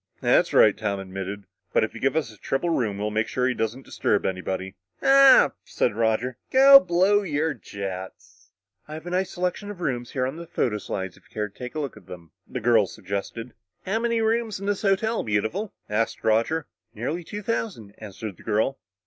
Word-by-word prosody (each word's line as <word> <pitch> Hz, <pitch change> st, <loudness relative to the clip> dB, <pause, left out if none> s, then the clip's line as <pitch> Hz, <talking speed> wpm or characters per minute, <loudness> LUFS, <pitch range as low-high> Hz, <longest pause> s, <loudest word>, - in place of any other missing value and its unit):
"That's -, -, +3 dB
right," 105 Hz, -, +6 dB
Tom 105 Hz, -2 st, -2 dB
admitted. 95 Hz, +1 st, -6 dB, 0.3 s
"But -, -, +4 dB
if -, -, -2 dB
you'll -, -, -9 dB
give 135 Hz, +2 st, +1 dB
us 145 Hz, -9 st, -1 dB
a -, -, -18 dB
triple 150 Hz, -, -1 dB
room, 110 Hz, -10 st, 0 dB
we'll 105 Hz, +1 st, -2 dB
make 110 Hz, +1 st, 0 dB
sure 125 Hz, 0 st, 0 dB
he 130 Hz, -, +1 dB
doesn't 120 Hz, +3 st, -3 dB
disturb -, -, 0 dB
anybody." 95 Hz, 0 st, -3 dB, 0.3 s
"Ah," 275 Hz, -1 st, +7 dB
said -, -, 0 dB
Roger, 115 Hz, +3 st, 0 dB
"go 275 Hz, +1 st, +9 dB
blow 185 Hz, +1 st, +3 dB
your 160 Hz, -4 st, -1 dB
jets!" 95 Hz, -6 st, -8 dB, 0.4 s
"I 155 Hz, -, -7 dB
have 160 Hz, -, -9 dB
a 175 Hz, -, -5 dB
nice 185 Hz, +1 st, 0 dB
selection 180 Hz, +3 st, -3 dB
of 205 Hz, -3 st, -8 dB
rooms 125 Hz, -7 st, -2 dB
here 130 Hz, -2 st, 0 dB
on 155 Hz, +6 st, -5 dB
photo 120 Hz, -10 st, -1 dB
slides 95 Hz, -2 st, -5 dB
if -, -, -23 dB
you'd 105 Hz, -2 st, -3 dB
care 125 Hz, -1 st, -7 dB
to 155 Hz, -, -6 dB
look 140 Hz, -3 st, -4 dB
at -, -, -16 dB
them," 85 Hz, -4 st, -11 dB, 0.2 s
the -, -, -4 dB
girl 110 Hz, -3 st, +4 dB
suggested. 100 Hz, +6 st, -6 dB, 0.3 s
"How 210 Hz, +4 st, 0 dB
many 230 Hz, -1 st, 0 dB
rooms 225 Hz, -2 st, 0 dB
in 200 Hz, -, -6 dB
this 205 Hz, -1 st, -1 dB
hotel, 220 Hz, +3 st, +1 dB
Beautiful?" 110 Hz, -, -1 dB, 0.2 s
asked 110 Hz, +2 st, -1 dB
Roger. 115 Hz, +9 st, +1 dB, 0.3 s
"Nearly 150 Hz, +11 st, -3 dB
two 205 Hz, +5 st, -7 dB
thousand," 195 Hz, -, -3 dB
answered 105 Hz, -2 st, -7 dB
the -, -, -16 dB
girl. 110 Hz, +6 st, 0 dB
125 Hz, 195 wpm, -25 LUFS, -, 0.4 s, go